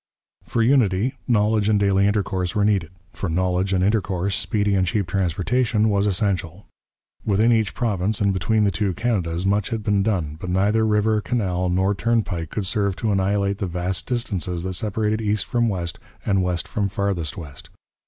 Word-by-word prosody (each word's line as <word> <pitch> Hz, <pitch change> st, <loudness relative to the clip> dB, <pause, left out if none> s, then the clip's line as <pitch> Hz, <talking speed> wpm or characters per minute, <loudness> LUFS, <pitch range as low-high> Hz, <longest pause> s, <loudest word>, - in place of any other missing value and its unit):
For 115 Hz, -, 0 dB
unity, 120 Hz, -2 st, +2 dB
knowledge 105 Hz, -2 st, +2 dB
and 105 Hz, -1 st, +3 dB
daily 100 Hz, 0 st, +3 dB
intercourse 95 Hz, -3 st, -1 dB
were 105 Hz, -1 st, +2 dB
needed; 100 Hz, -6 st, +1 dB, 0.2 s
for 95 Hz, -, -4 dB
knowledge 90 Hz, +2 st, 0 dB
and 90 Hz, -1 st, +2 dB
intercourse, 95 Hz, -2 st, 0 dB
speedy 105 Hz, 0 st, 0 dB
and 95 Hz, -2 st, +2 dB
cheap 100 Hz, +2 st, 0 dB
transportation 100 Hz, +5 st, +1 dB
was 100 Hz, 0 st, +2 dB
essential. 95 Hz, -2 st, -1 dB, 0.6 s
Within 110 Hz, +3 st, +3 dB
each 110 Hz, -4 st, +1 dB
province 105 Hz, -3 st, 0 dB
and 100 Hz, -1 st, +2 dB
between 100 Hz, +4 st, +1 dB
the 100 Hz, -, +2 dB
two 95 Hz, -1 st, -1 dB
Canadas 90 Hz, -7 st, -1 dB
much 100 Hz, +1 st, +1 dB
had 115 Hz, -3 st, -3 dB
been 105 Hz, -1 st, +2 dB
done, 90 Hz, -8 st, -1 dB
but 90 Hz, -, -5 dB
neither 105 Hz, +4 st, +2 dB
river, 105 Hz, 0 st, +2 dB
canal, 95 Hz, -7 st, -1 dB
nor 95 Hz, +3 st, +2 dB
turnpike 100 Hz, -7 st, -1 dB
could 105 Hz, -, -3 dB
serve 100 Hz, -1 st, 0 dB
to 110 Hz, +1 st, -1 dB
annihilate 100 Hz, 0 st, 0 dB
the 100 Hz, -, -1 dB
vast 90 Hz, +1 st, -3 dB
distances 95 Hz, -8 st, -2 dB
that 95 Hz, 0 st, -3 dB
separated 105 Hz, +3 st, -1 dB
east 105 Hz, -2 st, 0 dB
from 120 Hz, -1 st, +1 dB
west 85 Hz, -4 st, -3 dB, 0.3 s
and 95 Hz, -2 st, +2 dB
west 90 Hz, -2 st, -1 dB
from 100 Hz, -2 st, -1 dB
farthest 95 Hz, -6 st, -2 dB
west. 75 Hz, -6 st, -9 dB
100 Hz, 175 wpm, -22 LUFS, 90-105 Hz, 0.6 s, and